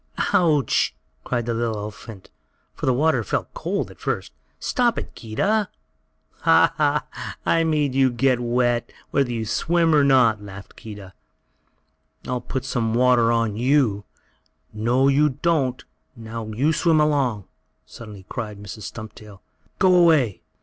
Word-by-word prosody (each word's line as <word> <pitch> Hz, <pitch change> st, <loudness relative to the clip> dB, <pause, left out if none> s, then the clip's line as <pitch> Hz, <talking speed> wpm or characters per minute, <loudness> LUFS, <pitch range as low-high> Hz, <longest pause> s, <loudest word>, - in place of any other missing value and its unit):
"Ouch!" 155 Hz, -6 st, +2 dB, 0.3 s
cried 120 Hz, -2 st, -2 dB
the 120 Hz, -, -1 dB
little 115 Hz, -1 st, -1 dB
elephant 105 Hz, -1 st, -8 dB
baby, -, -, -23 dB, 0.4 s
for -, -, -6 dB
the 130 Hz, -, +4 dB
water 155 Hz, +5 st, +2 dB
felt -, -, -3 dB
cold, -, -, -3 dB
at -, -, -17 dB
first. -, -, -3 dB, 0.3 s
"Stop 245 Hz, -3 st, 0 dB
it, -, -, -6 dB
Keedah!" 200 Hz, -, -1 dB, 0.7 s
"Ha! -, -, +4 dB
Ha! -, -, +1 dB, 0.4 s
I 165 Hz, -, +3 dB
made 150 Hz, -4 st, 0 dB
you 135 Hz, 0 st, +3 dB
get 125 Hz, +1 st, +1 dB
wet, 120 Hz, 0 st, 0 dB, 0.2 s
whether 135 Hz, -3 st, +1 dB
you 115 Hz, -2 st, -3 dB
swim 165 Hz, +8 st, +1 dB
or 150 Hz, -2 st, +5 dB
not!" 125 Hz, -6 st, +4 dB
laughed 100 Hz, -1 st, -11 dB
Keedah. 100 Hz, -3 st, -10 dB, 1.1 s
"I'll 125 Hz, -1 st, -3 dB
put 130 Hz, +1 st, -5 dB
some 120 Hz, -3 st, -1 dB
more 110 Hz, +1 st, 0 dB
water 120 Hz, -2 st, +4 dB
on 115 Hz, -3 st, 0 dB
you!" 125 Hz, -5 st, +2 dB, 0.7 s
"No 120 Hz, +5 st, +1 dB
you 145 Hz, +2 st, +4 dB
don't! 140 Hz, -7 st, +1 dB, 0.3 s
Now 115 Hz, -1 st, -7 dB
you 130 Hz, +9 st, 0 dB
swim 160 Hz, -1 st, +2 dB
along!" 135 Hz, -, +1 dB, 0.4 s
suddenly 105 Hz, -5 st, -12 dB
cried 105 Hz, -2 st, -5 dB
Mrs. 105 Hz, 0 st, -8 dB
Stumptail. 105 Hz, -2 st, -11 dB, 0.4 s
"Get -, -, +3 dB
away!" 160 Hz, -, +4 dB
120 Hz, 145 wpm, -22 LUFS, 110-145 Hz, 1.1 s, or